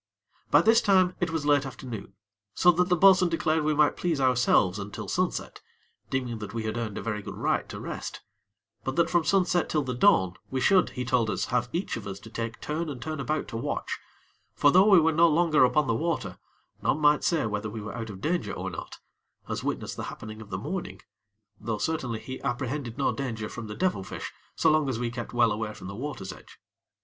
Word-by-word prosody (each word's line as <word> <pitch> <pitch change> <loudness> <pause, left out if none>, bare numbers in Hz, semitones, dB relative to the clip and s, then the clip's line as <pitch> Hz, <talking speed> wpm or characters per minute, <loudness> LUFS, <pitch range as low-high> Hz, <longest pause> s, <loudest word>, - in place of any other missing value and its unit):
By - - +6
this 225 +1 +5
time 185 -3 +3
it 175 - 0
was 160 -2 -2
late 145 -2 +4
afternoon, 120 -7 -8 0.4
so 180 - +6
that 180 +1 +1
the 180 - +4
bo'sun 185 0 +6
declared 160 -1 +1
we 155 0 +1
might 150 0 +4
please 170 -5 -1
ourselves 125 -7 +3
until 100 +1 -6
sunset, - - -2 0.5
deeming 125 -4 -2
that 105 +1 -7
we 115 - -2
had 110 0 -3
earned 115 -4 -3
a - - -4
very 105 -2 -2
good - - -8
right - - 0
to - - -6
rest; - - -6 0.6
but 130 - -3
that 170 0 +2
from 175 -2 +3
sunset 180 0 +2
till 150 -2 +1
the 130 -1 -3
dawn 125 - +4 0.2
we 130 - -1
should, 185 +6 +4
he 125 - -2
told 120 -2 +2
us, - - -1
have 120 0 +1
each 175 -5 -2
of 105 - -7
us 100 0 -6
to 110 - -12
take 115 0 -4
turn 155 +2 -3
and 135 -4 -6
turn 155 +3 -5
about 150 +2 -2
to 115 - -4
watch; 115 - -3 0.6
for 145 - +5
though 190 +5 +6
we 195 -4 +8
were 160 0 +3
no 165 +2 +5
longer 160 -2 +4
upon 130 +4 +3
the 115 - +1
water, 115 - -2 0.4
none - - +1
might 150 0 +4
say 165 -8 +1
whether 105 0 -2
we 110 +1 -6
were 105 +1 -6
out 115 -1 -5
of 95 -2 -9
danger 170 +6 -1
or - - -4
not, - - -8 0.5
as - - -3
witness - - -3
the - - -5
happening 110 0 -8
of 105 - -11
the 95 - -3
morning; 180 - -5 0.6
though, 110 -2 -3
certainly, 125 -2 -2
he 130 +3 -7
apprehended 130 -1 -3
no 140 - +1
danger 115 -6 -4
from 115 0 -7
the 105 - -6
devil 180 - 0
fish - - -7 0.2
so - - +4
long 155 -2 +2
as 125 - -1
we 120 0 -2
kept 120 0 -6
well 120 -2 +3
away 105 0 -3
from - - -11
the 100 - -6
water's 120 -7 -5
edge. - - -16
130 Hz, 225 wpm, -27 LUFS, 110-160 Hz, 0.6 s, we